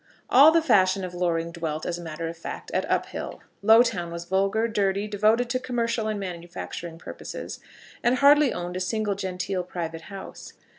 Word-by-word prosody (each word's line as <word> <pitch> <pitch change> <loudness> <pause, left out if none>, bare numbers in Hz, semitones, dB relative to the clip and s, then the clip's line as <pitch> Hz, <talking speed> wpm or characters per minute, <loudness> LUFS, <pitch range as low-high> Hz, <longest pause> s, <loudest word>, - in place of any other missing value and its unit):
All 280 +5 +9
the 330 0 +3
fashion 195 -8 +3
of 180 -1 -5
Loring 170 -2 -1
dwelt, 160 -2 -4
as 175 0 -2
a - - -7
matter 165 0 -5
of 165 0 -8
course, - - -5
at - - -1
Uphill. - - -2 0.2
Lowtown 220 -5 +4
was 170 0 -6
vulgar, 195 +5 +1
dirty, 200 -2 0
devoted 215 +4 +2
to 255 - +1
commercial 235 -3 -1
and 215 -1 -2
manufacturing 175 -2 -6
purposes, - - -7 0.4
and 240 +1 +3
hardly 285 +1 +6
owned 175 0 -4
a - - -2
single 210 +2 -1
genteel 185 -1 -3
private 165 -2 -5
house. 195 -1 -9
190 Hz, 170 wpm, -26 LUFS, 175-225 Hz, 0.4 s, All